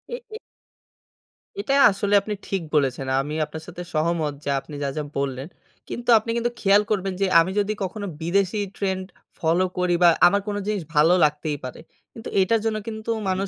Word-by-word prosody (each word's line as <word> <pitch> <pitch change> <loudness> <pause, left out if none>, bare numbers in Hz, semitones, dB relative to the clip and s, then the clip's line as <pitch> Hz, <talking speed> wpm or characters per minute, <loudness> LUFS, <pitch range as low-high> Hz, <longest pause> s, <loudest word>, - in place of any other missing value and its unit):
এ - - -5 0.2
এ - - -4 1.2
এটা 275 - -1 0.2
আসলে 200 +1 -2
আপনি 210 +1 -4
ঠিক 195 -2 -1
বলেছেন। 135 -2 +1
আমি 150 +2 -5
আপনার 160 +1 -9
সাথে 180 0 -8
সহমত 155 -1 0
যে - - -3
আপনি 150 +2 -11
যা, 140 - 0
যা 150 - -1
বললেন। 135 0 -2 0.4
কিন্তু 240 +1 -5
আপনি 220 - -10
কিন্তু 235 +1 0
খেয়াল 200 +1 +5
করবেন 195 -2 0
যে - - +4
আমি 165 +3 +2
যদি 205 +1 0
কখনো 200 +2 -4 0.2
বিদেশি 195 +4 +1 0.2
ট্রেন্ড 190 -1 -2 0.3
ফলো 170 +3 +2
করি 180 -1 +2
বা 170 - +8 0.2
আমার 200 +3 +2
কোন 205 - -2
জিনিস 210 -4 -1
ভালো 155 +4 +5
লাগতেই 150 0 0
পারে। 130 -1 -7 0.3
কিন্তু 225 - -8
এটার 220 +4 +2
জন্য 220 -1 0
কিন্তু 220 0 -4 0.2
মানুষ 190 +1 -1
185 Hz, 185 wpm, -23 LUFS, 155-205 Hz, 1.2 s, বা